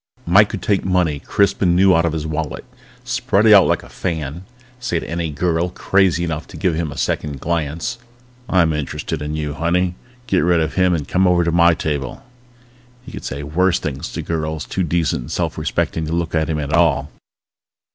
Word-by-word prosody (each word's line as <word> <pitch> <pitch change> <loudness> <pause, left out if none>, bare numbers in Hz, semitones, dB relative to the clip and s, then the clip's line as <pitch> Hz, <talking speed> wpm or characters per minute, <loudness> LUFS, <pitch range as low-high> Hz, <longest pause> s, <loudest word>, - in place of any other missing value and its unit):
Mike 100 +4 +5
could 100 -5 -5
take 100 -2 +1
money 90 -6 +1
crisp 100 +6 +1
and 90 -3 +3
new 95 +1 +5
out 85 +1 +3
of 85 - 0
his 80 -1 -3
wallet, 80 -1 -4 0.4
spread 100 +3 +1
it 110 - +8
out 100 -3 +7
like - - 0
a - - -12
fan, 80 0 -4 0.3
say 120 -9 -1
to - - -8
any 85 0 -2
girl 85 +3 0
crazy 90 -1 +1
enough 80 -2 -3
to - - -11
give 90 -4 +1
him 80 -2 -2
a 70 - -9
second 70 +2 -2
glance: 85 - -2 0.5
"I'm 85 -4 +3
interested 75 +1 -3
in 75 +1 -3
you, 75 -1 -3
honey! 85 +3 0 0.3
Get 95 -6 +1
rid 85 +1 +3
of 80 -1 -1
him 90 -2 +3
and 75 -3 -4
come 95 +1 +2
over 90 -1 +3
to 85 - 0
my 85 0 +5
table!" 70 -6 -3 0.8
He - - -10
could - - -8
say 70 +2 -4
worse 90 +5 +1
things 70 -3 -5
to - - -4
girls 80 -2 -3
too 95 - -3
decent 85 -4 0
and - - -9
self - - -1
respecting 80 -1 -1
to 80 - -3
look 85 0 -1
at 80 -1 +1
him 80 - -1
at 75 +1 -3
all. 85 -3 +2
85 Hz, 205 wpm, -19 LUFS, 75-90 Hz, 0.8 s, it